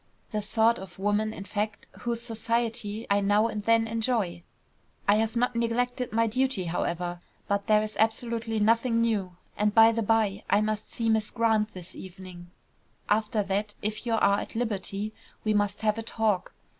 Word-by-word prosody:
The 215 - -1
sort 225 +2 +3
of 185 -2 -10
woman, 205 +2 +1
in 195 - -7
fact, 210 +1 -3
whose 235 -1 -3
society 230 -1 -2
I 200 - +5
now 205 +2 +3
and 215 -2 -2
then 230 0 +4
enjoy. 220 -6 -1 0.7
I 205 +1 +5
have 225 +1 0
not 245 +1 +1
neglected 245 +2 0
my 230 +1 +2
duty, 255 -2 0
however, 175 +1 -2 0.3
but 200 0 -1
there 215 0 +4
is 215 0 -5
absolutely 225 0 0
nothing 230 +2 +3
new. 205 -6 0 0.2
And, 210 0 +1
by 225 0 +8
the 230 0 -1
bye, 215 -2 +1
I 205 - +4
must 215 0 -2
see 230 -2 -2
Miss 220 -1 +2
Grant 220 -2 +1
this 185 0 -8
evening; 185 -2 -10 0.6
after 215 0 +2
that, 200 +2 -2
if 215 +1 -2
you 230 - +1
are 200 -2 +3
at - - -7
liberty, 210 -2 -2 0.3
we 215 - +1
must 205 0 0
have 215 0 +1
a - - -1
talk. 220 -4 0
215 Hz, 175 wpm, -27 LUFS, 205-230 Hz, 0.7 s, by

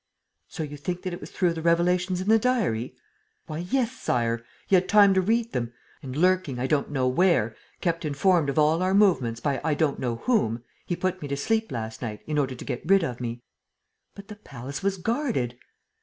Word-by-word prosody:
"So 160 - -5
you 145 -1 -7
think 175 +5 -4
that 185 -2 -3
it 175 - -7
was - - -8
through 180 -3 +1
the 165 - -5
revelations 180 +2 +2
in 190 - -5
the 225 +1 +5
diary... 185 - 0 0.3
?" - - -45
"Why, 155 0 -5
yes, 235 +7 0
Sire! 115 - -1 0.2
He - - -4
had 185 0 +4
time 200 -2 +7
to 190 - +3
read 230 +4 +1
them. 120 -1 -2 0.3
And, 130 -1 -7
lurking 180 -6 +2
I 125 - -1
don't 140 +1 +1
know 135 -3 0
where, 130 - +2 0.3
kept 165 -2 -1
informed 155 +1 +2
of 140 - -3
all 155 +3 +3
our 185 +1 +2
movements 150 - +3
by 140 -3 -1
I 155 -2 +1
don't 150 -2 0
know 120 -2 -1
whom, 120 - 0 0.2
he 175 - -1
put 185 +1 -2
me 145 - -4
to 140 0 -2
sleep 220 +6 0
last 110 -2 -5
night, 110 -4 -5
in 150 -1 -1
order 135 -2 -1
to - - -9
get 120 - -3
rid 195 -2 +5
of 125 -5 -4
me." 120 0 -5 0.7
"But 200 0 -11
the 210 - -9
palace 140 - -8
was 195 0 0
guarded." 200 - -1
165 Hz, 215 wpm, -26 LUFS, 130-190 Hz, 0.7 s, time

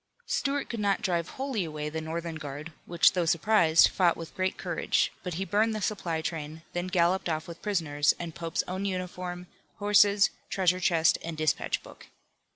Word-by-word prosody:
Stuart 280 0 -1
could 230 - -5
not 200 -1 +1
drive 175 -4 0
wholly 265 -7 -1
away 150 -2 -4
the 160 +1 -4
Northern 165 +1 -4
guard, 150 +1 -7 0.2
which 170 0 +4
though 175 -3 0
surprised, 170 -1 +5
fought 175 -3 +2
with 165 -1 -8
great 185 0 -1
courage, - - 0
but 180 -3 -5
he 190 +3 -2
burned 215 +3 +1
the - - -2
supply 170 -6 -2
train, 160 -1 -5
then 175 +1 -2
galloped 180 0 +1
off 160 +2 -2
with 170 -1 -9
prisoners, 160 -8 +1
and 170 -2 -6
Pope's 165 -1 -2
own 185 +2 -3
uniform, 180 -1 -4 0.3
horses, 205 0 +4 0.2
treasure 185 -1 +2
chest 165 -3 +3
and 165 -1 -5
dispatch 155 0 0
book. - - -14
175 Hz, 175 wpm, -28 LUFS, 160-195 Hz, 0.3 s, surprised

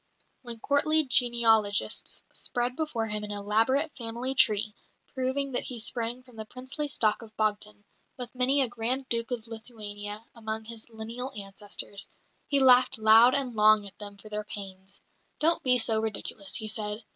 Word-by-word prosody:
When 235 -3 -9
courtly 310 +4 +3
genealogists 230 -5 +2
spread 245 0 -2
before 280 -8 -2
him 210 -1 -2
an 210 - -5
elaborate 225 +9 +1
family 240 +1 -1
tree, 215 -4 +4 0.4
proving 265 +1 -1
that 245 - -1
he 250 - -3
sprang 235 +2 -2
from 250 -3 -18
the 220 - -5
princely 260 +6 -5
stock 220 -6 +1
of 220 -1 -14
Bogdan, 210 -1 -1 0.3
with 245 -1 -7
many 265 +2 +2
a - - 0
Grand 245 +3 -2
Duke 230 0 0
of 240 -3 -4
Lithuania 215 -2 -7
among 220 -1 -5
his 230 0 -6
lineal 230 +4 -6
ancestors, 200 0 -5 0.4
he 280 - +2
laughed 255 -2 +5
loud 225 +3 +6
and 260 -4 -2
long 215 -1 +5
at 200 - -13
them 205 -1 -8
for 205 - -14
their 210 0 -3
pains. 195 -2 -7 0.3
"Don't 330 +2 +2
be 250 -1 +3
so 225 -2 +3
ridiculous," 210 -2 -4
he 220 -1 -1
said. 210 0 -2
225 Hz, 165 wpm, -28 LUFS, 210-255 Hz, 0.4 s, loud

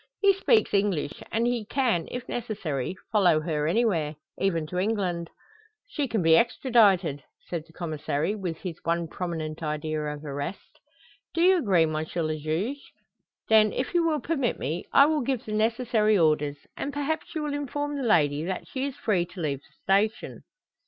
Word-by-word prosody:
He 400 -1 +5
speaks 435 +3 +2
English, 195 -8 0
and 230 +1 +1
he 240 -2 0
can, 225 -6 0
if 250 0 -6
necessary, 185 - -3 0.2
follow 180 -8 +4
her 155 -2 -1
anywhere, 170 -6 +1 0.2
even 170 -5 +1
to 180 +4 -3
England." 185 -5 -1 0.6
"She 290 - -1
can 220 -6 0
be 160 0 +6
extradited," 200 - +3 0.3
said 165 -3 -4
the 165 - -20
Commissary, 155 0 -2
with 185 -6 -4
his 170 -2 -6
one 170 0 0
prominent 160 -3 -4
idea 155 0 -2
of 150 0 -5
arrest. 145 +6 -6 0.6
"Do 335 - +2
you 370 +1 +6
agree, 190 - +3
M. 155 -1 -1
le 155 0 -2
Juge? 165 - -2 0.7
Then, 215 -1 +5
if 255 - -2
you 345 -1 +3
will 315 -2 +1
permit 275 -4 0
me, 155 +6 -3
I 280 - +7
will 305 0 +1
give 255 -1 -2
the 215 - -5
necessary 220 -1 +2
orders, 150 -3 +2 0.2
and 280 - -3
perhaps 290 +3 -3
you 310 - -1
will 295 -1 -2
inform 290 +1 -3
the 280 - -3
lady 155 - +3
that 185 +2 -4
she 265 0 -3
is 280 -2 -4
free 180 -6 0
to 185 - -11
leave 145 -5 -1
the - - -29 0.3
station?" 220 - -10
190 Hz, 175 wpm, -27 LUFS, 155-245 Hz, 0.7 s, I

